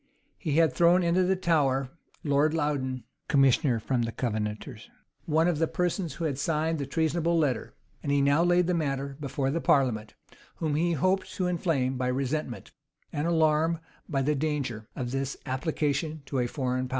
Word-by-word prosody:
He 155 -6 -2
had 160 -2 +4
thrown 175 +5 +4
into 170 +2 +3
the 185 +1 +2
Tower 140 -7 +1 0.3
Lord 150 +2 +2
Loudon, 135 -5 -1 0.2
commissioner 135 -2 +3
from 125 +2 0
the 115 -1 -1
Covenanters, 105 -3 -4 0.4
one 160 +1 +2
of 170 -4 +1
the 165 - +2
persons 175 -3 -1
who 170 - -3
had 140 -3 -2
signed 160 +1 0
the 140 - -3
treasonable 165 +3 +1
letter.[*] 140 -7 0 0.3
And 140 - -2
he 145 - +3
now 140 +4 +4
laid 175 0 +4
the 180 - +1
matter 140 -4 -2
before 135 -1 -1
the 165 +3 -1
parliament, 120 -6 +1 0.4
whom 155 -2 -2
he 170 +3 +1
hoped 185 +5 +1
to 185 - -1
inflame 160 -7 0
by 125 0 -1
the 125 - +1
resentment, 135 -1 -3 0.4
and 150 +3 -1
alarm 160 0 +2 0.3
by 135 -4 0
the 150 +3 +2
danger, 140 -7 -2
of 125 -1 -3
this 135 0 -2
application 150 +2 -1
to 135 -1 -2
a 120 - +1
foreign 130 0 -2
power. - - -15
145 Hz, 180 wpm, -28 LUFS, 130-165 Hz, 0.4 s, had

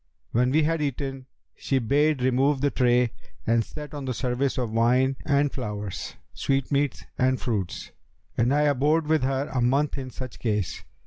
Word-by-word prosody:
When 125 +2 +2
we 155 +4 +3
had 165 +1 +1
eaten 135 -2 -3 0.3
she 135 - -1
bade 140 +3 +2
remove 130 +2 +2
the 145 0 +2
tray 125 -2 +3 0.3
and 115 0 +3
set 150 +5 -9
on 145 -2 -5
the 130 -2 -2
service 125 +2 -1
of 120 -4 -1
wine 125 +4 +3
and 145 -1 +3
flowers, 105 -6 -5 0.2
sweetmeats 140 +1 0
and 130 0 +2
fruits; 100 -7 -3 0.4
and 120 +2 +2
I 145 +1 +3
abode 150 +2 +2
with 155 0 +2
her 135 +2 0
a 130 - +1
month 140 +4 +1
in 130 -1 -6
such 130 -2 -8
case. 105 -6 -2
130 Hz, 170 wpm, -26 LUFS, 125-145 Hz, 0.4 s, we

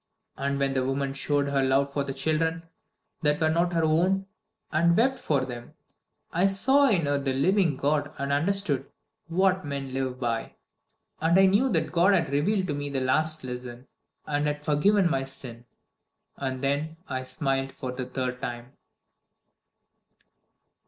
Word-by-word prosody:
And 140 0 -2
when 140 0 0
the 130 -1 0
woman 135 +1 -1
showed 140 +1 0
her 140 -1 +1
love 135 +1 +1
for 140 - 0
the 140 - -4
children 160 +4 -1 0.6
that 150 -2 +2
were 155 -1 +2
not 170 +2 +1
her 165 -1 +1
own, 180 +5 +2 0.5
and 170 +2 +3
wept 255 +1 +1
over 140 -4 +2
them, 120 -2 -9 0.6
I 180 +3 +3
saw 265 +9 +4
in 180 -8 +2
her 145 0 +1
the 135 -1 -1
living 165 +2 +2
God 145 +1 0
and 140 0 -2
understood 150 -3 +1 0.4
What 185 +2 +2
men 140 -2 -5
live 130 -1 -3
by. 115 -3 -2 0.7
And 165 +3 +3
I 195 - +7
knew 205 +8 +3
that 160 -2 +1
God 180 +3 +4
had 165 -4 0
revealed 190 +7 +1
to - - 0
me 145 0 -4
the 140 -1 -2
last 155 +4 +2
lesson, 125 0 -7 0.4
and 145 0 0
had 150 0 -3
forgiven 185 +6 +3
my 135 -5 0
sin. 125 -3 -6 0.7
And 130 -1 -4
then 145 +4 -1
I 130 0 -3
smiled 135 0 -2
for 130 -1 -6
the 125 0 -5
third 125 0 -3
time." 120 0 -6
145 Hz, 165 wpm, -26 LUFS, 135-170 Hz, 0.7 s, I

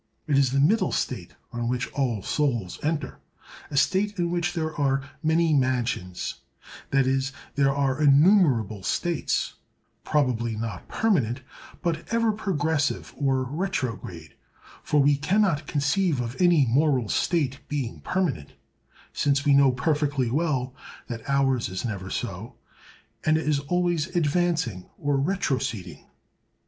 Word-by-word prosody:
It 150 -3 +1
is 135 -2 +3
the 135 - +1
middle 195 +11 +3
state, - - -3 0.2
on 120 0 -2
which 125 0 -1
all 120 -8 -1
souls 120 -11 -1
enter—a 150 -1 -6
state 200 +7 +2
in 170 -1 0
which 175 0 -1
there 160 -2 -2
are 135 -1 0
many 160 0 +2
mansions; 125 -9 -1 0.5
that 135 -1 +3
is, 135 0 0 0.2
there 140 0 +3
are 135 0 0
innumerable 140 - +4
states—probably 125 - -2
not 110 0 -5
permanent, 135 - +1 0.4
but 165 0 -2
ever 230 -1 +2
progressive 160 -8 -1
or 135 -2 +1
retrograde; 125 - -4 0.5
for 150 - +1
we 140 0 +4
can 190 +9 +2
not 160 -7 0
conceive 150 +2 +1
of 120 0 -3
any 175 -6 +5
moral 130 -1 +2
state 140 - 0
being 140 -6 -3
permanent, 160 - -2 0.6
since 140 0 +1
we 145 - +5
know 140 -1 +6
perfectly 145 -2 0
well 135 -4 0 0.4
that 115 +2 -6
ours 135 -4 +2
is 95 +5 -4
never 95 -5 -4
so; - - -5 0.7
it 155 0 +3
is 150 -2 +1 0.2
always 175 -3 +1
advancing 160 - 0
or 145 -1 0
retroceding. 135 - -2
140 Hz, 130 wpm, -25 LUFS, 125-160 Hz, 0.7 s, know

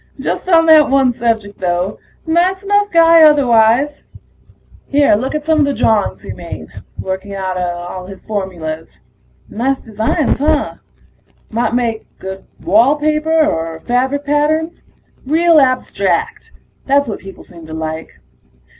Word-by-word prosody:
Just - - -3
on 330 -2 +5
that 315 -2 +6
one 270 -2 +3
subject, 225 -4 -2
though; 180 +2 -2 0.3
nice 360 +4 +1
enough 410 0 +1
guy 330 -1 +6
otherwise. 275 -2 +4 0.9
Here, 285 -3 +3
look 255 +8 -1
at 300 -1 -3
some 320 -1 +2
of 295 - +4
the 280 - -1
drawings 220 -2 0
he - - -7
made, - - -9 0.3
working 190 +1 -5
out 180 -1 -4
his 195 - -11
formulas. 175 -7 -5 0.5
Nice 265 +5 -2
designs, 225 +8 -1
huh? 300 +1 0 0.7
Might 235 +1 -1
make 230 -3 -2
good 190 0 -8 0.2
wall 230 - +4
paper 310 +1 +1
or 165 - -3
fabric 260 +4 -1
patterns. 310 +3 -1 0.4
Real 325 +2 +4
abstract... 255 -2 0 0.4
that's 280 0 +2
what 215 - -5
people 195 0 -12
seem 170 -2 -14
to 160 - -9
like. 160 0 -5
250 Hz, 135 wpm, -16 LUFS, 195-305 Hz, 0.9 s, that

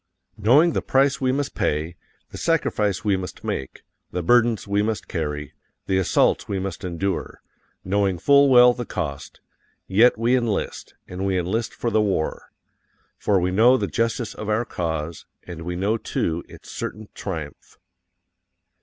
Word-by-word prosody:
_KNOWING 145 - +5
THE - - 0
PRICE 135 +1 +2
WE 130 -1 +2
MUST 140 +1 -2
PAY, 80 +3 -1 0.4
THE - - -8
SACRIFICE 105 - 0
WE 100 -2 +2
MUST 90 -2 -7
MAKE, 65 - -5 0.3
THE 90 - -3
BURDENS 120 +1 +3
WE 100 +1 +1
MUST 110 0 -2
CARRY, 75 -3 -4 0.3
THE 95 0 +1
ASSAULTS 95 - +2
WE 100 - -2
MUST 95 -3 -5
ENDURE 95 +2 -3 0.5
KNOWING 95 -1 +1
FULL 140 +7 +5
WELL 125 -1 +7
THE 120 -1 -6
COST 70 -4 -5 0.4
yet 115 +6 +4
we 115 +3 +2
enlist, 120 -5 -2
and 90 +1 -5
we 95 -1 +1
enlist 100 +6 -2
for 120 - -2
the 110 0 +3
war. 95 -7 -2 0.7
FOR 100 -2 +2
WE 90 +1 0
KNOW 120 +7 +5
THE - - -1
JUSTICE 115 -1 -1
OF 110 - -6
OUR 110 +3 +1
CAUSE, 80 -4 -4 0.2
and 85 -2 -8
we 90 +1 -4
know, 100 +5 0
too, 85 -5 -2
its - - -13
certain 110 0 -6
triumph. 80 -7 -7
100 Hz, 160 wpm, -23 LUFS, 90-120 Hz, 0.7 s, WELL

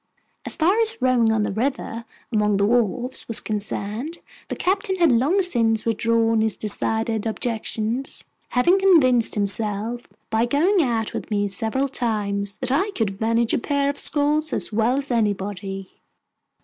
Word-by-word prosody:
As - - -3
far 365 +7 +2
as 455 0 +2
rowing 245 -3 +3
on 220 -1 +1
the 205 - -2
river, 230 0 -3 0.3
among 210 -2 +2
the 200 - +2
wharves, 240 +3 0
was 230 - +4
concerned, 215 +8 -3 0.3
the - - -4
Captain 385 +1 0
had 340 -5 +3
long 290 +12 +3
since 230 -10 +1
withdrawn 225 0 +2
his 220 -1 0
decided 220 +1 -2
objections, 225 +2 -3 0.3
having 345 +10 +3
convinced 270 - +4
himself, 210 +3 -1 0.2
by 225 +2 +2
going 340 +9 +3
out 230 -6 -1
with - - -5
me 205 -1 0
several 225 +8 -1
times, 205 -6 -1
that 255 +1 -4
I 355 +10 +1
could 200 -3 -2
manage 230 +1 +1
a - - +2
pair 280 +2 0
of 285 - -4
sculls 300 +1 0
as - - -1
well 230 +4 +2
as 275 -1 -3
anybody. 200 -3 -2
230 Hz, 155 wpm, -22 LUFS, 215-280 Hz, 0.3 s, was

